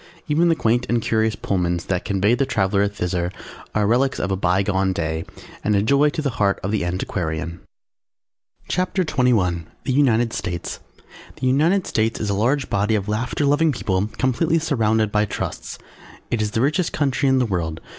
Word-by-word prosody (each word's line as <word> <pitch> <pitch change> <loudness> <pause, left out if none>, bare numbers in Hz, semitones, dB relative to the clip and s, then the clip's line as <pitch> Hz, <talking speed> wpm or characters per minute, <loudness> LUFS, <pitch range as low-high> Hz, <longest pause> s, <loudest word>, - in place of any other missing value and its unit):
Even 165 +3 +3
the 165 - +3
quaint 120 -2 +1
and 120 - +2
curious 110 0 +1
Pullmans 90 -3 -1
that 90 -1 -2
convey 100 +2 +2
the 125 +3 +2
traveller 100 -4 +1
thither 90 -3 -2 0.4
are 105 -1 +2
relics 125 +5 +2
of 95 - -1
a - - +2
bygone 95 +1 +1
day 80 -2 -2 0.4
and 105 - +2
a 100 - +2
joy 140 +6 +4
to 155 +1 -4
the 140 - 0
heart 100 -1 +2
of 95 - -2
the 105 -4 0
antiquarian. 85 -2 -3 1.1
CHAPTER 185 +1 0
XXI 105 - +1 0.2
THE 130 - -1
UNITED 120 -4 +3
STATES 85 -1 -4 0.6
The 130 - -4
United 160 +9 +3
States 110 0 0
is 105 -2 -1
a - - +1
large 125 +7 +1
body 105 +2 +1
of 100 -1 -2
laughter 120 +7 -1
loving 150 +3 +3
people 100 -6 -1
completely 130 +6 +1
surrounded 110 -9 +1
by 105 0 +2
Trusts. 100 - -5 0.5
It 115 - 0
is 105 - 0
the 110 +2 -1
richest 155 +6 +1
country 140 -1 +1
in 130 - +3
the 130 - +2
world. 85 -6 -2
110 Hz, 180 wpm, -22 LUFS, 95-135 Hz, 1.1 s, joy